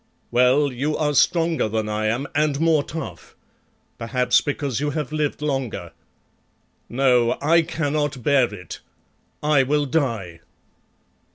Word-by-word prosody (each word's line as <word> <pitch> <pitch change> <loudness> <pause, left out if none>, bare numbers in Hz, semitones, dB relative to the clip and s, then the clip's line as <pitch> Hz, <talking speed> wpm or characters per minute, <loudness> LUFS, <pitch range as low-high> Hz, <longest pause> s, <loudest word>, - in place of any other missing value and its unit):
Well, 130 +4 +3
you 145 +5 -1
are 150 -2 0
stronger 165 -3 +2
than 110 0 -2
I 105 0 -1
am, 120 +6 -1
and 145 -1 +1
more 160 -2 +3
tough; 125 - -8 0.6
perhaps 125 +1 +2
because 140 -4 -2
you 145 +1 -1
have 150 -2 -3
lived 150 -1 -2
longer. 135 -5 -3 1.0
No, 125 -2 +2
I 165 +3 +4
cannot 145 -5 -2
bear 135 -4 +3
it. 90 -5 -9 0.6
I 150 -2 +4
will 145 +2 +1
die." 115 - -2
140 Hz, 125 wpm, -22 LUFS, 120-150 Hz, 1.0 s, I